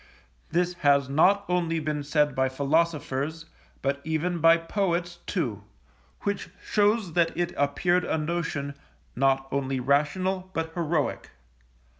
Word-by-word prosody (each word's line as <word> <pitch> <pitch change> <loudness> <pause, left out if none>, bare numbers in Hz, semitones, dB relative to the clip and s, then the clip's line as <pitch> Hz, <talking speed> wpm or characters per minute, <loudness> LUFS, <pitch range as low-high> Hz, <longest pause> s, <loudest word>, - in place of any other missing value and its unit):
This 180 +1 +1
has 140 -2 +4
not 195 +8 +4
only 170 -2 0
been 150 -1 -2
said 150 0 +1
by 130 0 +1
philosophers, 150 +1 0 0.4
but 140 +1 0
even 160 +3 -1
by 165 +1 +6
poets, 175 0 -1
too; 115 - -2 0.6
which 200 -1 -2
shows 205 -3 +1
that 165 -1 +3
it 175 0 -1
appeared 175 +6 +1
a - - 0
notion, 155 -3 -2 0.4
not 135 +1 +2
only 135 -1 -1
rational, 185 +8 0
but 160 0 -2
heroic. 165 -3 -1
160 Hz, 125 wpm, -26 LUFS, 140-175 Hz, 0.6 s, by